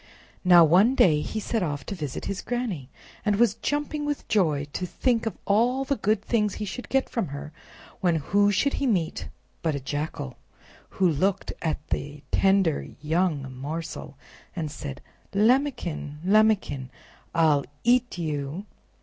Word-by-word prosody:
Now 175 Hz, -2 st, +8 dB
one 195 Hz, -, +5 dB
day 155 Hz, -, +5 dB
he 215 Hz, -, -3 dB
set 220 Hz, +1 st, -1 dB
off 145 Hz, -6 st, -2 dB
to -, -, -4 dB
visit 150 Hz, -8 st, -5 dB
his 195 Hz, -, -3 dB
Granny, 220 Hz, -, -3 dB, 0.3 s
and 210 Hz, -2 st, +2 dB
was 225 Hz, -1 st, +4 dB
jumping 295 Hz, +4 st, -2 dB
with 290 Hz, -1 st, -3 dB
joy 155 Hz, -9 st, +2 dB
to 180 Hz, -, -2 dB
think 230 Hz, +6 st, 0 dB
of 225 Hz, -, -4 dB
all 245 Hz, +6 st, +2 dB
the 280 Hz, -, +1 dB
good 210 Hz, -2 st, 0 dB
things 210 Hz, -4 st, +1 dB
he 210 Hz, -, -4 dB
should 245 Hz, +5 st, -6 dB
get 270 Hz, 0 st, +2 dB
from 230 Hz, -7 st, -2 dB
her, 140 Hz, +2 st, -7 dB, 0.5 s
when 175 Hz, -3 st, +2 dB
who 200 Hz, +7 st, +2 dB
should 280 Hz, +8 st, +1 dB
he 275 Hz, -, +2 dB
meet 175 Hz, -8 st, -1 dB, 0.3 s
but 160 Hz, -3 st, 0 dB
a -, -, -2 dB
Jackal, 145 Hz, -1 st, -4 dB, 0.6 s
who 190 Hz, -, +4 dB
looked 185 Hz, +5 st, 0 dB
at 155 Hz, -2 st, -2 dB
the 145 Hz, 0 st, -4 dB
tender 190 Hz, -5 st, +3 dB
young 150 Hz, -4 st, 0 dB
morsel 150 Hz, 0 st, -6 dB, 0.4 s
and 160 Hz, -4 st, -3 dB
said: 140 Hz, -3 st, -7 dB, 0.3 s
"Lambikin! 215 Hz, -, +1 dB
Lambikin! 195 Hz, -10 st, +3 dB, 0.5 s
I'll 155 Hz, -4 st, +4 dB, 0.2 s
EAT 245 Hz, -3 st, +3 dB
YOU!" 155 Hz, +2 st, -3 dB
180 Hz, 155 wpm, -26 LUFS, 150-220 Hz, 0.6 s, Now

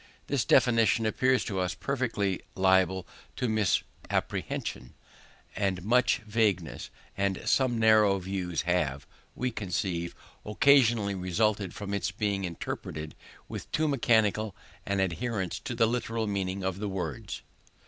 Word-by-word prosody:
This 135 Hz, -6 st, 0 dB
definition 115 Hz, -1 st, +4 dB
appears 130 Hz, +4 st, +2 dB
to 95 Hz, -3 st, -2 dB
us 90 Hz, -1 st, -1 dB
peculiarly 105 Hz, -2 st, -1 dB
liable 95 Hz, -1 st, +3 dB, 0.3 s
to 125 Hz, -, -1 dB
misapprehension; 105 Hz, -, -2 dB, 0.6 s
and 95 Hz, -3 st, -1 dB
much 125 Hz, +2 st, +3 dB
vagueness 105 Hz, -6 st, 0 dB, 0.3 s
and 100 Hz, -1 st, 0 dB
some 130 Hz, -3 st, +3 dB
narrow 110 Hz, -3 st, +5 dB
views 90 Hz, -2 st, -3 dB
have, 80 Hz, -6 st, 0 dB, 0.3 s
we 125 Hz, 0 st, -1 dB
conceive, 90 Hz, -4 st, -2 dB, 0.3 s
occasionally 115 Hz, -3 st, +4 dB
resulted 95 Hz, +1 st, 0 dB
from 100 Hz, -1 st, -5 dB
its 100 Hz, -2 st, 0 dB
being 100 Hz, -1 st, -1 dB
interpreted 80 Hz, -2 st, -5 dB, 0.3 s
with -, -, -7 dB
too 155 Hz, 0 st, +1 dB
mechanical 110 Hz, -6 st, +2 dB, 0.3 s
an 100 Hz, 0 st, 0 dB
adherence 95 Hz, +1 st, -2 dB
to 120 Hz, -, -5 dB
the 115 Hz, -, +4 dB
literal 115 Hz, -1 st, -1 dB
meaning 100 Hz, -2 st, -2 dB
of 95 Hz, 0 st, -2 dB
the 105 Hz, -1 st, -2 dB
words. 90 Hz, -8 st, -5 dB
100 Hz, 125 wpm, -29 LUFS, 95-115 Hz, 0.6 s, narrow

